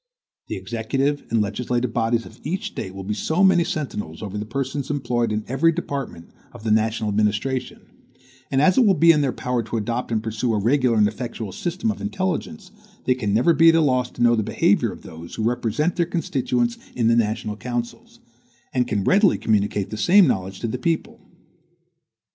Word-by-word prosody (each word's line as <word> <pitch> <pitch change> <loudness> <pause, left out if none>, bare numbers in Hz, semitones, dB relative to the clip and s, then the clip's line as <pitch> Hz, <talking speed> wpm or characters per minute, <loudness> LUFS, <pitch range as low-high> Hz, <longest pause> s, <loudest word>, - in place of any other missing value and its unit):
The - - -4
executive 135 +5 -2
and 115 -1 +2
legislative 120 +3 -2
bodies 115 0 0
of 110 - -14
each 185 +6 -3
State 95 0 -6
will 95 - -6
be 105 +3 -2
so 160 - 0
many 185 -3 +5
sentinels 105 - -4
over 100 -1 -6
the 105 +1 -4
persons 135 +3 -3
employed 120 -5 -1
in 105 0 -1
every 135 +7 +3
department 140 - -5 0.2
of - - -12
the 110 - 0
national 110 0 +1
administration; 110 +5 -1 0.7
and 135 +1 +2
as 185 +8 +4
it 250 - +5
will 195 - +5
be 170 0 +6
in 150 -2 +3
their 135 -3 +1
power 125 -1 -2
to 115 +1 -4
adopt 115 +3 -3
and 110 -1 0
pursue 115 +1 -1
a - - +1
regular 125 +2 +2
and 105 -1 +5
effectual 110 -1 -5
system 180 - -2
of 210 - -8
intelligence, 175 - -3 0.3
they 130 - +4
can 115 -5 -2
never 120 +11 +4
be 165 +1 +6
at 165 - +5
a 165 - +4
loss 125 -4 +1
to - - -3
know 120 0 +5
the 110 - +1
behavior - - +1
of - - -12
those 80 +1 -10
who 110 - -3
represent 120 +7 0
their 170 -2 +1
constituents 125 -8 -1 0.2
in 115 -2 +1
the 115 - +4
national 110 -2 0
councils, 120 +1 -5 0.5
and 125 -1 +1
can 100 -2 -1
readily 195 - +4
communicate 105 -2 0
the 110 - -4
same 185 - +6
knowledge 95 - -1
to 115 - -1
the 120 +3 -4
people. 165 +4 -2
120 Hz, 200 wpm, -22 LUFS, 110-145 Hz, 0.7 s, be